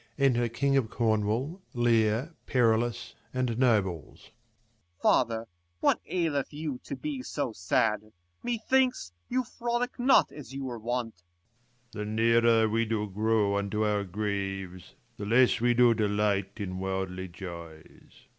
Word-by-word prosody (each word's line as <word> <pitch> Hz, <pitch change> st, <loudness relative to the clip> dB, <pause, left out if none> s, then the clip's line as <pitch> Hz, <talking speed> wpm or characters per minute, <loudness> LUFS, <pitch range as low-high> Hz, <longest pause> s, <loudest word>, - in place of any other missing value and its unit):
Enter 125 Hz, -4 st, +2 dB
king 140 Hz, +4 st, +1 dB
of 120 Hz, -5 st, +1 dB
Corn 110 Hz, -3 st, +1 dB
wall, 135 Hz, -, -2 dB
Leir, 120 Hz, +4 st, +2 dB
Perillus, 120 Hz, -1 st, +1 dB, 0.2 s
and 125 Hz, -2 st, 0 dB
nobles. 100 Hz, -, 0 dB, 0.7 s
Corn. 125 Hz, -, +4 dB
OFatheiy 115 Hz, 0 st, -4 dB, 0.3 s
what -, -, +3 dB
aileth 160 Hz, -6 st, -1 dB
you 150 Hz, -3 st, -4 dB
to -, -, -4 dB
be 295 Hz, -4 st, -4 dB
so 145 Hz, -, -3 dB
sad? 105 Hz, +3 st, 0 dB, 0.3 s
Methinks, 245 Hz, -, +1 dB, 0.2 s
you 255 Hz, +1 st, +1 dB
frolic 240 Hz, +1 st, -3 dB
not 255 Hz, +2 st, +5 dB
as 135 Hz, -3 st, -10 dB
you 135 Hz, -, -4 dB
were 120 Hz, -3 st, -5 dB
wont. 115 Hz, -4 st, -3 dB, 0.7 s
Leir. 105 Hz, -1 st, -4 dB
The 105 Hz, -, -5 dB
nearer 115 Hz, 0 st, +4 dB
we 115 Hz, +1 st, +1 dB
do 110 Hz, -1 st, -1 dB
grow 105 Hz, 0 st, +1 dB
unto 105 Hz, +2 st, -1 dB
our 105 Hz, -1 st, +1 dB
graves, 95 Hz, -1 st, -4 dB, 0.2 s
The 100 Hz, -2 st, -5 dB
less 120 Hz, +1 st, +4 dB
we 120 Hz, 0 st, +3 dB
do 120 Hz, -1 st, +6 dB
delight 105 Hz, -2 st, 0 dB
in 95 Hz, -3 st, -4 dB
worldly 95 Hz, -1 st, -3 dB
joys. 85 Hz, -3 st, -11 dB
115 Hz, 140 wpm, -28 LUFS, 100-130 Hz, 0.7 s, do